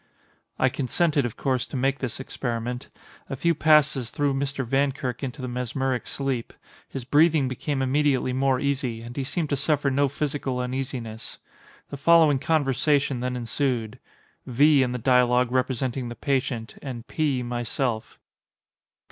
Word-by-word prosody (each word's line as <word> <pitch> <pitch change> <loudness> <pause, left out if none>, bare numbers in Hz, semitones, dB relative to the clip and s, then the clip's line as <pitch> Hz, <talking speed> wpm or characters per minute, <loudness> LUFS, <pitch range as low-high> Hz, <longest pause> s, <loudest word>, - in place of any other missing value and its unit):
I 130 - +3
consented 140 +2 +1
of 115 - -10
course 130 -2 0
to - - -5
make 135 +2 +1
this 130 -3 -4
experiment. 125 -1 -4 0.4
A 135 - -3
few 170 +6 +2
passes 150 -6 +3
threw 145 +1 0
Mr. 135 -1 -2
Vankirk 135 0 -1
into 135 0 -5
the - - -2
mesmeric 125 +1 -2
sleep. 135 -4 -3 0.4
His 135 -3 -6
breathing 150 0 +4
became 135 +2 -2
immediately 135 -1 +1
more 130 0 +2
easy, 130 -5 -1
and 120 +1 -9
he 140 - -2
seemed 155 +3 -2
to - - +3
suffer 145 0 +1
no 140 +2 +3
physical 140 -2 -2
uneasiness. 125 -3 -4 0.5
The 140 - -5
following 155 -1 +5
conversation 140 -2 +1
then 125 +1 -2
ensued:—V. 125 +3 0
in 125 -1 +1
the 125 - -2
dialogue 125 0 +3
representing 130 -1 -1
the 120 - -7
patient, 130 -5 -2
and 125 -4 -6
P. 140 -5 0
myself. 120 -1 -3
130 Hz, 145 wpm, -25 LUFS, 125-140 Hz, 0.5 s, following